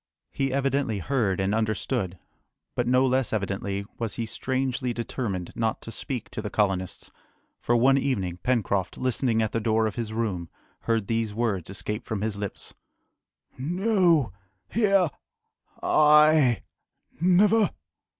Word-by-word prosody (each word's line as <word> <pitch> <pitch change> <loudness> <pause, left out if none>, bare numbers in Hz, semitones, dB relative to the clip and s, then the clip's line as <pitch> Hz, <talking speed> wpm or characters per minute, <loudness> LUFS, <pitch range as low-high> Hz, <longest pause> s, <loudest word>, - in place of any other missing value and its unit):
He 135 -1 -1
evidently 135 -4 0
heard 105 -2 0
and 95 +1 +1
understood, 110 -4 -1 0.6
but 120 - -1
no 125 +1 +4
less 130 -1 +1
evidently 100 -1 -2
was 115 -3 -2
he 115 - -2
strangely 130 +1 -2
determined 115 -6 -3
not 110 -1 0
to 115 - -7
speak 115 -1 -5
to - - -4
the 105 - -4
colonists; 95 -4 -1 0.5
for 120 - +1
one 135 +3 +5
evening, 95 -11 -1
Pencroft, 100 -7 0
listening 125 -2 +1
at 110 - -2
the 115 - 0
door 110 0 +2
of 110 - -1
his 115 -2 -3
room, 100 -7 -2 0.4
heard 115 -3 +1
these 115 -1 -1
words 110 -8 -1
escape 105 +3 -4
from 110 -3 -2
his 110 -2 -1
lips: 100 -1 -6 0.9
"No! 175 - +2 0.4
here! 200 -5 +3 0.8
I! 150 -4 +5 0.6
never!" 200 +5 +4
115 Hz, 135 wpm, -26 LUFS, 105-135 Hz, 0.9 s, one